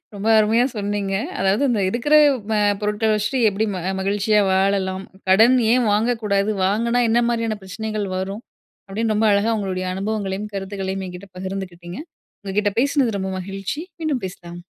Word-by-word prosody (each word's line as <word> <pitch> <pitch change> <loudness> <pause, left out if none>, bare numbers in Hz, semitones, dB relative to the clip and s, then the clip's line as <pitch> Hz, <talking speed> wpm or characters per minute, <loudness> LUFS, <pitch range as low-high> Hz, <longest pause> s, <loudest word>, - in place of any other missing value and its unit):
ரொம்ப 200 +2 -4
அருமையா 225 +3 +3
சொன்னீங்க. 205 -1 -2 0.3
அதாவது, 195 +6 +2
இந்த 225 -4 +1
இருக்கிற 240 +8 -1 0.4
அ - - +2 0.2
பொருட்கள 210 +1 0
வச்சுட்டு 220 +5 -1
எப்படி 205 +2 -1
ம - - -3 0.2
மகிழ்ச்சியா 205 +2 +2
வாழலாம். 190 0 +1 0.2
கடன் 225 +7 +6 0.2
ஏன் 245 -2 +3
வாங்கக்கூடாது, 210 -2 +1
வாங்குனா 235 +5 +1
என்ன 235 +2 +3
மாதிரியான 230 -2 -1
பிரச்சனைகள் 215 +2 -4
வரும். 195 +4 -4 0.4
அப்படின்னு 220 +3 -1
ரொம்ப 220 +1 +2
அழகா 205 +3 +2
உங்களுடைய 185 -2 -3
அனுபவங்களையும், 200 0 -3
கருத்துக்களையும் 195 0 -4
என்கிட்ட 180 +2 -10
பகிர்ந்துகிட்டீங்க. 185 -1 -6 0.4
உங்க 195 -2 -6
கிட்ட 205 -1 +1
பேசினது 270 -6 +1
ரொம்ப 190 0 -3
மகிழ்ச்சி. 195 - -5 0.2
மீண்டும் 290 -8 -1
பேசலாம்! 175 -1 -11
205 Hz, 145 wpm, -21 LUFS, 190-220 Hz, 0.4 s, கடன்